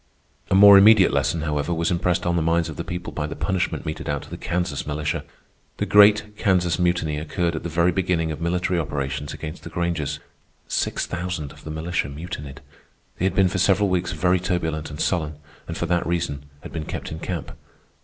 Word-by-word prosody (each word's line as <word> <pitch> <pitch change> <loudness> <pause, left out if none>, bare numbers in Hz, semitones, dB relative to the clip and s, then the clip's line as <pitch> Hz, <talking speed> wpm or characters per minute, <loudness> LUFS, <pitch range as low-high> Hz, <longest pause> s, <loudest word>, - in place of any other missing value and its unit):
A - - +3
more 100 0 +10
immediate 100 -4 +6
lesson, 70 +4 +1
however, 75 +1 -1
was 85 +1 0
impressed 90 +1 0
on 85 0 +1
the 85 - +1
minds 85 +1 +1
of 80 - -7
the - - -4
people 90 0 -6
by 75 -1 -2
the 75 - -6
punishment 95 -3 -1
meted 80 +1 -4
out 70 -1 -2
to - - -14
the - - -5
Kansas 85 -5 -2
militia. 75 0 -2 0.5
The - - -1
great 105 0 +5
Kansas 90 -4 +2
Mutiny 85 -4 +1
occurred 85 +2 -1
at - - -3
the 85 - -4
very 85 +2 +2
beginning 85 -3 0
of 75 - -6
military 90 +1 0
operations 70 -2 -3
against 80 +2 -7
the - - -8
Grangers. 85 -3 -2 0.5
Six - - -1
thousand 85 -5 -4
of - - -15
the - - -6
militia 80 -1 -2
mutinied. 75 -2 -7 0.6
They 95 - +1
had 95 -1 0
been 95 0 +5
for 95 - -2
several 95 +2 +3
weeks 90 -1 0
very 90 +2 +2
turbulent 80 -4 -2
and 75 0 -8
sullen, 80 -5 0 0.3
and 85 - -5
for - - -1
that 85 0 0
reason 75 -4 -2 0.2
had - - -10
been 80 -2 -4
kept - - -5
in 80 - -5
camp. 85 -2 -4
85 Hz, 205 wpm, -23 LUFS, 75-90 Hz, 0.6 s, more